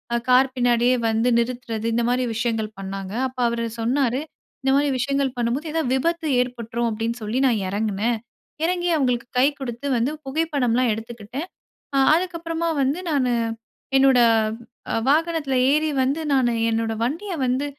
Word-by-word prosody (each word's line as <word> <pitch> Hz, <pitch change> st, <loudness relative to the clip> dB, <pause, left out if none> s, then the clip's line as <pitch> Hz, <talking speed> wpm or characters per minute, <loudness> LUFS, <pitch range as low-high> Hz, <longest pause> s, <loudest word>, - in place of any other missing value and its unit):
அ -, -, +3 dB
car 255 Hz, +1 st, +6 dB
பின்னாடியே 245 Hz, 0 st, +3 dB
வந்து 225 Hz, +2 st, +2 dB
நிறுத்துறது, 235 Hz, -2 st, -3 dB
இந்த 235 Hz, -, +1 dB
மாரி 250 Hz, +1 st, +1 dB
விஷயங்கள் 225 Hz, -2 st, -1 dB
பண்ணாங்க. 195 Hz, 0 st, -6 dB
அப்ப 255 Hz, 0 st, -14 dB
அவரு 235 Hz, 0 st, -1 dB
சொன்னாரு 250 Hz, +2 st, +1 dB, 0.4 s
"இந்த 265 Hz, -, +2 dB
மாதிரி 285 Hz, +1 st, +2 dB
விஷயங்கள் 275 Hz, 0 st, 0 dB
பண்ணும்போது 245 Hz, +7 st, -1 dB
ஏதாவது 320 Hz, -6 st, 0 dB
விபத்து 330 Hz, +4 st, 0 dB
ஏற்பட்டுரும் 235 Hz, -1 st, -2 dB
அப்படின்னு 225 Hz, +1 st, -2 dB
சொல்லி 215 Hz, +4 st, -2 dB
நான் 225 Hz, -5 st, +1 dB
எறங்கினேன். 215 Hz, +3 st, 0 dB, 0.5 s
எறங்கி 355 Hz, 0 st, 0 dB
அவங்களுக்கு 250 Hz, -4 st, 0 dB
கை 255 Hz, -, +6 dB
கொடுத்து 255 Hz, +1 st, -5 dB
வந்து 240 Hz, +5 st, 0 dB
புகைப்படம்லாம் 265 Hz, -5 st, +1 dB
எடுத்துக்கிட்டேன். 230 Hz, -, -6 dB, 0.5 s
அ -, -, +3 dB, 0.2 s
அதுக்கப்பறமா 335 Hz, -1 st, -2 dB
வந்து 280 Hz, +7 st, 0 dB
நானு 255 Hz, -4 st, +1 dB, 0.6 s
என்னோட, 270 Hz, -1 st, +5 dB, 0.9 s
வாகனத்ல 315 Hz, -2 st, +1 dB, 0.2 s
ஏறி 305 Hz, +2 st, +2 dB
வந்து 275 Hz, +5 st, 0 dB
நானு 250 Hz, -3 st, +3 dB, 0.2 s
என்னோட 225 Hz, 0 st, 0 dB
வண்டிய 335 Hz, -, -2 dB
வந்து 255 Hz, +3 st, 0 dB
250 Hz, 140 wpm, -23 LUFS, 230-285 Hz, 0.9 s, car